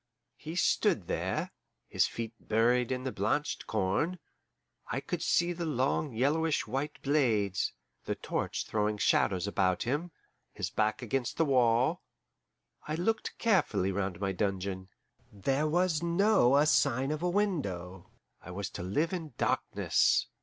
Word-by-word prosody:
He 155 Hz, +3 st, -7 dB
stood 175 Hz, -, +2 dB
there, -, -, -2 dB, 0.4 s
his -, -, +2 dB
feet 115 Hz, -1 st, -5 dB
buried 120 Hz, +3 st, +2 dB
in 130 Hz, 0 st, -2 dB
the 130 Hz, -, -2 dB
blanched 125 Hz, +10 st, -1 dB
corn 110 Hz, -, 0 dB, 0.7 s
I -, -, 0 dB
could -, -, -4 dB
see 175 Hz, 0 st, +2 dB
the 170 Hz, -1 st, -4 dB
long 140 Hz, +1 st, 0 dB
yellowish 145 Hz, +7 st, +1 dB
white 135 Hz, +6 st, -3 dB
blades 110 Hz, -10 st, +1 dB, 0.3 s
the -, -, -2 dB
torch -, -, -3 dB
throwing 105 Hz, 0 st, 0 dB
shadows 95 Hz, -2 st, +2 dB
about 95 Hz, -3 st, +1 dB
him, 145 Hz, +8 st, -1 dB, 0.4 s
his -, -, -4 dB
back 110 Hz, +4 st, 0 dB
against 125 Hz, +1 st, -2 dB
the 165 Hz, -, +3 dB
wall. 125 Hz, -3 st, +3 dB, 0.9 s
I 155 Hz, -, -1 dB
looked 220 Hz, +7 st, -1 dB
carefully 180 Hz, -, +2 dB
round 95 Hz, -2 st, -2 dB
my 100 Hz, -1 st, -1 dB
dungeon. 95 Hz, -1 st, -2 dB, 0.4 s
There 135 Hz, +9 st, 0 dB
was 175 Hz, 0 st, +1 dB
no 170 Hz, -, +4 dB
a 145 Hz, -, +5 dB
sign 135 Hz, -2 st, +2 dB
of 155 Hz, 0 st, -3 dB
a 180 Hz, -, +1 dB
window; 100 Hz, -, -2 dB, 0.3 s
I -, -, -12 dB
was 100 Hz, +3 st, -4 dB
to -, -, -6 dB
live 145 Hz, -, 0 dB
in 160 Hz, -8 st, -5 dB
darkness. -, -, +2 dB
130 Hz, 145 wpm, -30 LUFS, 100-155 Hz, 0.9 s, a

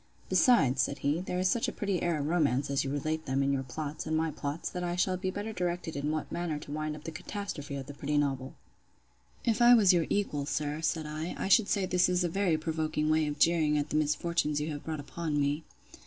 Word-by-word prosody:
—Besides, 140 Hz, -, +4 dB
said 140 Hz, -, -1 dB
he, 145 Hz, +4 st, +2 dB
there 180 Hz, -1 st, -3 dB
is 185 Hz, +1 st, +2 dB
such 230 Hz, +5 st, +1 dB
a -, -, -1 dB
pretty 200 Hz, -3 st, -2 dB
air 170 Hz, -2 st, +1 dB
of 145 Hz, -, -2 dB
romance, 145 Hz, -4 st, +1 dB
as 140 Hz, -, +1 dB
you 135 Hz, -, -3 dB
relate 155 Hz, +3 st, -2 dB
them, 135 Hz, +1 st, +1 dB
in 140 Hz, 0 st, +1 dB
your 135 Hz, -, 0 dB
plots, 145 Hz, +3 st, -5 dB
and 160 Hz, 0 st, +1 dB
my 160 Hz, 0 st, 0 dB
plots, 145 Hz, +2 st, -4 dB
that 180 Hz, -1 st, -4 dB
I 175 Hz, 0 st, -1 dB
shall 185 Hz, +1 st, +1 dB
be 185 Hz, +1 st, -2 dB
better 205 Hz, +3 st, -4 dB
directed 175 Hz, -3 st, -2 dB
in 140 Hz, +1 st, -2 dB
what 155 Hz, 0 st, -3 dB
manner 170 Hz, -3 st, -2 dB
to 145 Hz, -, -9 dB
wind 155 Hz, 0 st, -3 dB
up 150 Hz, -, -11 dB
the 165 Hz, -, -5 dB
catastrophe 165 Hz, -4 st, -5 dB
of 135 Hz, -1 st, -5 dB
the 145 Hz, -, -8 dB
pretty 145 Hz, +1 st, -2 dB
novel. 135 Hz, -2 st, -1 dB, 0.9 s
If 230 Hz, -1 st, +1 dB
I 240 Hz, +1 st, +9 dB
was 200 Hz, -5 st, +6 dB
your 170 Hz, -2 st, +2 dB
equal, 150 Hz, -9 st, -1 dB
sir, 150 Hz, +1 st, -2 dB
said 160 Hz, -1 st, 0 dB
I, 155 Hz, +3 st, -4 dB
I -, -, -2 dB
should 200 Hz, +1 st, +5 dB
say 200 Hz, -3 st, +1 dB
this 180 Hz, 0 st, +2 dB
is 180 Hz, 0 st, +2 dB
a 175 Hz, -, 0 dB
very 180 Hz, -2 st, +1 dB
provoking 155 Hz, -1 st, -1 dB
way 155 Hz, -1 st, +2 dB
of 145 Hz, 0 st, -3 dB
jeering 155 Hz, -2 st, +3 dB
at 145 Hz, 0 st, -2 dB
the -, -, -1 dB
misfortunes 150 Hz, 0 st, +1 dB
you 150 Hz, +2 st, -2 dB
have 145 Hz, -1 st, -6 dB
brought 160 Hz, -1 st, -4 dB
upon 150 Hz, +1 st, -3 dB
me. 145 Hz, +2 st, 0 dB
155 Hz, 245 wpm, -30 LUFS, 145-175 Hz, 0.9 s, I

